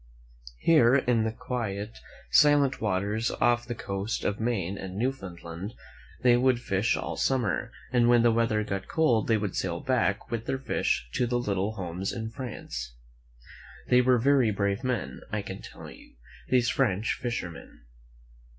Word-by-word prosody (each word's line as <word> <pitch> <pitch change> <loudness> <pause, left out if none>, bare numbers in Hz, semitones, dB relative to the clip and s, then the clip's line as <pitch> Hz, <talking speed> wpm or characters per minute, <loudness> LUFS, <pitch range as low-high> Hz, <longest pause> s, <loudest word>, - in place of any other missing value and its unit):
Here, 130 - +5
in 125 -5 +2
the 110 - 0
quiet, 110 -3 -4 0.3
silent 145 -2 +5
waters, 105 +2 0
off 120 0 +2
the 120 - -3
coasts 100 +1 -3
of 105 - -1
Maine 105 -5 -1
and 95 -1 -7
Newfound 110 -8 -3
land, 85 +6 -7 0.5
they 125 -1 +6
would 125 -1 +3
fish 100 -1 0
all - - -4
summer, 120 -9 0 0.2
and 120 -1 +4
when 120 -1 +5
the 120 - +5
weather 115 -2 +1
got 100 -2 -4
cold, 140 -9 +2
they 115 - +3
would 105 -3 -3
sail 85 -2 -2
back 115 -6 0
with 115 -1 -3
their 135 - 0
fish 130 - -1
to 125 - +1
their 120 +1 0
little 105 -3 -1
homes 95 -1 -4
in 110 -1 -5
France. 60 - -6 0.9
They 125 0 +6
were 125 0 +4
very 130 -1 +4
brave 100 +2 -1
men, 115 - -2
I 105 -1 -2
can 95 -1 -7
tell - - -11
you, - - -16 0.3
these 125 -1 +3
French 110 -5 +1
fishermen. 95 - -5
115 Hz, 160 wpm, -28 LUFS, 100-125 Hz, 0.9 s, they